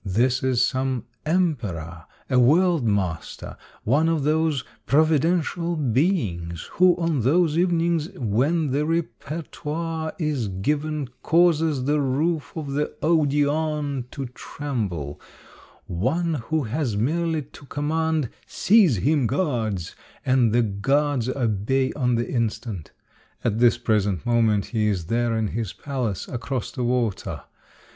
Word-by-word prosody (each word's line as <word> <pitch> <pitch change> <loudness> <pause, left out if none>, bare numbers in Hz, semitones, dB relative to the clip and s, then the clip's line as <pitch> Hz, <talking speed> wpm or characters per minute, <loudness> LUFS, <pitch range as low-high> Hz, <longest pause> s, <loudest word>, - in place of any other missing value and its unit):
This 120 +6 +1
is 130 -1 +3
some 130 -1 -1 0.2
emperor, 105 - -1 0.2
a 130 -2 +3
world 165 +4 +4
master, 95 -7 -2 0.3
one 150 +8 +3
of 160 -3 0
those 155 -2 +1 0.2
providential 160 +3 +2
beings 115 - 0
who 180 -1 +5
on 165 -6 0
those 155 +6 +3
evenings 170 -2 +1
when 135 +7 +1
the 145 +3 +1
repertoire 160 +1 -3
is 150 - -1
given 145 +8 -2
causes 160 -5 +3
the 150 +2 +2
roof 145 +2 0
of 150 -4 -4
the 145 +2 -2
Odeon 150 -3 +1
to 135 0 -5
tremble, 100 - -4 0.6
one 145 - 0 0.2
who 160 -2 +1
has 125 -2 -2
merely 160 +6 0
to 145 0 -15
com 145 +2 -3
mand, 160 -4 0
'* - - -33
Seize 195 - +4
him, 140 - +2
guards! 115 - -1
" - - -28
and 130 -3 +3
the 120 +2 +3
guards 130 +5 +1
obey 130 +2 0
on 125 -3 +1
the 120 +1 -1
instant. 115 - -3 0.5
At 110 -2 0
this 120 -1 +5
present 105 -3 0
moment 115 -4 +2
he 110 -2 +2
is 95 -5 -1
there 115 +3 0
in 110 -2 0
his 110 -2 -3
palace, 125 -8 -3
across 125 0 -4
the 125 - -3
water. 120 -4 -1
135 Hz, 130 wpm, -24 LUFS, 115-160 Hz, 0.6 s, who